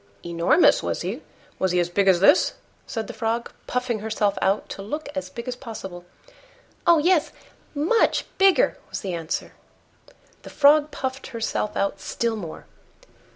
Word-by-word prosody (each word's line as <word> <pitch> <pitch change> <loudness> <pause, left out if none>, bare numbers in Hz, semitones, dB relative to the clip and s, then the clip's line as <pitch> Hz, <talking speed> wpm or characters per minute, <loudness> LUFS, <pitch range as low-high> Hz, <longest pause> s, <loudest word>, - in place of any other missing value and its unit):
"Enormous, 170 - +4
was - - -2
he? - - -4 0.4
Was 190 -1 +1
he 180 - +3
as 175 - +1
big 195 +2 +1
as 185 -2 +5
this?" 285 - +5 0.3
said 225 -2 -3
the - - -8
Frog, 230 +1 -2 0.2
puffing 250 -3 -1
herself 210 -1 0
out 195 +2 +1
to - - -6
look 300 +10 -5
as 280 - -4
big 235 +1 -8
as 250 - -3
possible. 190 -8 -8 0.8
"Oh! 340 -1 +7
yes, 325 0 +2 0.4
much 330 +11 +2
bigger," 390 +5 +4
was - - -5
the 190 -4 -4
answer. 165 -2 -3 0.9
The - - -11
Frog 295 +1 +5
puffed 265 -2 -4
herself 225 -2 -3
out 195 0 -1
still 230 +2 -2
more. 175 -7 -7
225 Hz, 155 wpm, -24 LUFS, 195-285 Hz, 0.9 s, Oh